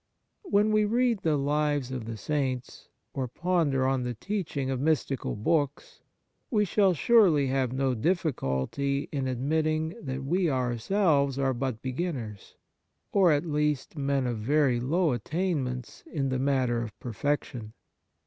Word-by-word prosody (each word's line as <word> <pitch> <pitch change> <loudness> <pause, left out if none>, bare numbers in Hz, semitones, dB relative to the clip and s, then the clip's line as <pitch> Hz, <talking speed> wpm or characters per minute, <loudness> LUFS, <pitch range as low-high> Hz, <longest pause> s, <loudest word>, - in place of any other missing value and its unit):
When 210 - +3
we 215 0 +4
read 235 +1 +2
the 155 -3 +2
lives 145 -2 0
of 125 -4 -4
the 115 0 -5
saints, 130 -1 -3 0.3
or 130 -2 -2
ponder 150 -2 +1
on 135 -1 +1
the 125 -1 -3
teaching 155 - -3
of 130 - -2
mystical 140 -3 0
books, 145 +6 -1 0.5
we 210 -3 +2
shall 195 -1 +3
surely 180 -7 +5
have 130 -2 0
no 130 0 0
difHculty 140 - -1
in 135 -3 -2
admitting 155 +5 0
that 135 0 -4
we 175 +5 +1
ourselves 140 - +1
are 135 -1 +1
but 125 -2 -3
be 130 -1 -3
ginners, 125 - -5 0.6
or 190 -4 +5
at 145 +3 +1
least 150 -2 -1
men 140 -2 0
of 120 -3 -2
very 135 +1 +2
low 160 +6 +1
attain 155 - -1
ments 125 -1 -6
in 140 -4 -1
the 130 -1 -1
matter 130 -3 +1
of 110 -3 -7
perfection. 120 -2 -3
140 Hz, 150 wpm, -28 LUFS, 125-160 Hz, 0.6 s, surely